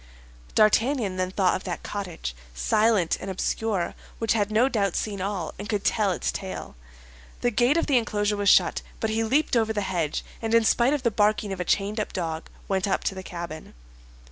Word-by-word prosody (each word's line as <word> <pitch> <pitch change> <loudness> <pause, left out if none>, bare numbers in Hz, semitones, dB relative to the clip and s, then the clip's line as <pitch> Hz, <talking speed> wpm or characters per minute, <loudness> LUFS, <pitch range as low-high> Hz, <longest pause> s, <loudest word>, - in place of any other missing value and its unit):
D'Artagnan 215 -1 +3
then 185 0 0
thought 190 -1 +2
of - - -5
that 180 - -4
cottage, 180 - -5 0.2
silent 210 - +2
and 195 - -5
obscure, 190 0 -1 0.2
which 225 -1 +1
had 210 -2 +1
no 220 +4 +3
doubt 200 -8 0
seen 200 -3 -2
all, 190 -4 -3
and 205 +2 -6
could 205 -2 -1
tell 210 -3 +2
its 180 - -1
tale. 190 -1 -6 0.7
The 245 - +2
gate 250 +6 +3
of 335 - +2
the 270 -4 +4
enclosure 210 -2 0
was 205 -1 +2
shut; - - +4 0.2
but 220 -2 -1
he 225 +1 +1
leaped 270 +5 +2
over 220 -1 +2
the 210 - -1
hedge, 175 -6 -2 0.2
and 225 0 +1
in 230 -1 +5
spite 240 +5 +4
of 280 - -4
the 235 - +2
barking 210 -1 +1
of 190 - -7
a 180 - -2
chained 205 +4 0
up 210 - -3
dog, 165 -3 -3 0.2
went 195 0 0
up 190 - 0
to - - 0
the 190 - -6
cabin. 170 - -7
205 Hz, 205 wpm, -26 LUFS, 185-225 Hz, 0.7 s, in